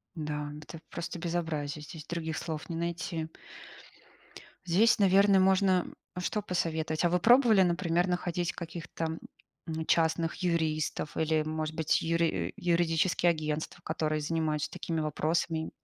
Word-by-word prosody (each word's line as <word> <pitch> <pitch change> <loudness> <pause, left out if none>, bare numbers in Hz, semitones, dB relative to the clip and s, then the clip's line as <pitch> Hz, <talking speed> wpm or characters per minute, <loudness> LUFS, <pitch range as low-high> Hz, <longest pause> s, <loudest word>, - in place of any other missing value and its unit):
Да. 150 -2 -3
Это 155 +2 -10
просто 170 0 -5
безобразие, 160 -4 -2
здесь 155 0 -9
других 160 -2 -3
слов 160 -1 -5
не 170 - -3
найти. 170 -1 -3 1.4
Здесь, 205 +7 +4
наверно, 195 0 +5
можно 190 -1 +4 0.3
что 210 +4 -1
посоветовать. 160 -4 -1
А 175 - +4
вы 180 - +2
пробовали, 235 -1 +6
например, 175 0 +2
находить 175 -1 -1
каких-то, 165 -1 -5 0.5
м, 160 0 -3
частных 165 0 +2
юристов 160 -4 -1
или, 160 -1 +2
может 155 0 -3
быть, 160 -2 +1
юри 165 0 0
юридические 175 -1 +2
агентства, 155 +1 -2
которые 155 -1 -1
занимаются 155 -1 -1
такими 165 -1 -3
вопросами? 160 +1 -1
165 Hz, 125 wpm, -30 LUFS, 155-175 Hz, 1.4 s, пробовали